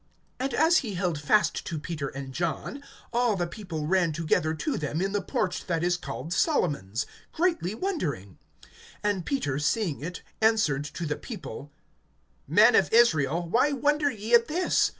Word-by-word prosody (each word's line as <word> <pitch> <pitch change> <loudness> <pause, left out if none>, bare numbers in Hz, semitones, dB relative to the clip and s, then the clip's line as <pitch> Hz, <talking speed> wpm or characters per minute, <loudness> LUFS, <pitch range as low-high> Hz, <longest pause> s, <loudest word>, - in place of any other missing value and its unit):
(11)And 265 0 -2
as 325 +5 +5
he 215 -6 -2
held 175 -5 -1
fast 210 +8 +2
to 165 - -4
Peter 150 -2 -4
and 135 -1 -7
John, 175 - -3 0.3
all 240 -2 +2
the 175 -2 -1
people 170 -5 -5
ran 175 0 +2
together 155 0 0
to 290 - -2
them 150 +1 -2
in 195 +2 0
the 205 0 0
porch 180 0 -2
that 165 -2 0
is 175 0 +2
called 160 -1 -5
Solomon's, 145 - 0 0.3
greatly 330 - 0
wondering. 150 - -3 0.6
(12)And 205 -4 0
Peter, 145 - -1
seeing 155 0 0
it, 180 +3 -6 0.2
answered 210 -11 +3
to 170 +3 -5
the 150 -1 -2
people: 145 - -8 0.8
Men 210 - +6
of - - +4
Israel, 170 - +3
why 255 - +3
wonder 290 +2 +2
ye 220 -2 -5
at 235 0 +6
this? 355 +4 +2
180 Hz, 165 wpm, -27 LUFS, 150-235 Hz, 0.8 s, Men